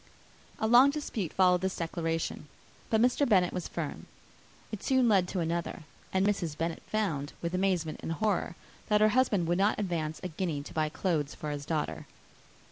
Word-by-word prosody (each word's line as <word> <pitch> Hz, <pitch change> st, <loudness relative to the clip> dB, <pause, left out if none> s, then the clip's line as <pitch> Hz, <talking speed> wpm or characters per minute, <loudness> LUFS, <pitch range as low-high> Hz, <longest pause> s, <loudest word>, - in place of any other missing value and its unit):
A -, -, -1 dB
long 245 Hz, +5 st, +7 dB
dispute 260 Hz, -, -3 dB
followed 180 Hz, -1 st, +4 dB
this 190 Hz, 0 st, -1 dB
declaration; 165 Hz, -2 st, -3 dB, 0.4 s
but 220 Hz, -, +3 dB
Mr. 250 Hz, +3 st, +3 dB
Bennet 185 Hz, -4 st, +4 dB
was 180 Hz, -, -3 dB
firm: -, -, -5 dB, 0.6 s
it 215 Hz, -, -5 dB
soon 260 Hz, -2 st, +3 dB
led 195 Hz, -5 st, +4 dB
to 180 Hz, 0 st, -2 dB
another; 170 Hz, 0 st, -2 dB, 0.3 s
and 190 Hz, +1 st, +2 dB
Mrs. 175 Hz, -7 st, -1 dB
Bennet 165 Hz, 0 st, -2 dB
found, 160 Hz, -10 st, -1 dB
with 170 Hz, +1 st, -3 dB
amazement 185 Hz, -4 st, 0 dB
and 165 Hz, -, -3 dB
horror, 200 Hz, -3 st, -1 dB, 0.3 s
that 210 Hz, -1 st, +3 dB
her 215 Hz, -, +6 dB
husband 210 Hz, -6 st, +2 dB
would 175 Hz, +2 st, +1 dB
not 205 Hz, +2 st, +3 dB
advance 165 Hz, -6 st, -2 dB
a -, -, -1 dB
guinea 160 Hz, -4 st, -3 dB
to -, -, -10 dB
buy 155 Hz, -1 st, 0 dB
clothes 150 Hz, -2 st, -1 dB
for 150 Hz, -, -5 dB
his 145 Hz, 0 st, -5 dB
daughter. 150 Hz, -, -2 dB
180 Hz, 180 wpm, -30 LUFS, 160-210 Hz, 0.6 s, long